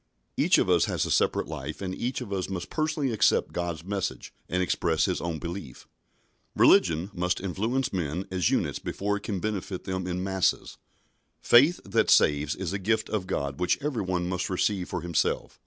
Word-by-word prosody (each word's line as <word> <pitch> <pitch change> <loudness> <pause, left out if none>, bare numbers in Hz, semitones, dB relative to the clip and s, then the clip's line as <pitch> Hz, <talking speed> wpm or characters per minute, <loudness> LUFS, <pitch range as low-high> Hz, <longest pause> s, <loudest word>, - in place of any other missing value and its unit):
Each - - +4
of - - +2
us - - +4
has - - -1
a - - -3
separate - - +2
life, 70 +3 -6
and 95 -2 -4
each 125 +6 -3
of 105 -5 -5
us 95 -1 -2
must 90 -2 -5
personally 155 -4 0
accept 110 - +2
God's 85 -2 -3
message 100 0 -4 0.2
and 90 +1 +1
express 80 -2 +1
his 90 - -1
own 85 -2 -3
belief. 85 -5 -7 0.7
Religion 85 +5 +4
must 90 0 -1
influence 110 +8 -1
men 90 0 -2
as 90 -4 +1
units - - 0
before 100 +1 -2
it - - -9
can 100 -2 -3
benefit 100 -2 -3
them 95 -1 -3
in 90 0 -2
masses. 95 -1 0 0.6
Faith 145 +9 +5
that - - +1
saves 75 +1 +4
is 95 -1 -4
a 100 - -2
gift 110 +4 0
of 100 -4 -2
God 70 -5 -3
which 90 - +2
every 135 -5 -2
one 90 -2 -1
must 90 0 -2
receive 95 0 0
for 90 - -3
himself. 85 -2 -1
95 Hz, 190 wpm, -27 LUFS, 85-100 Hz, 0.7 s, Faith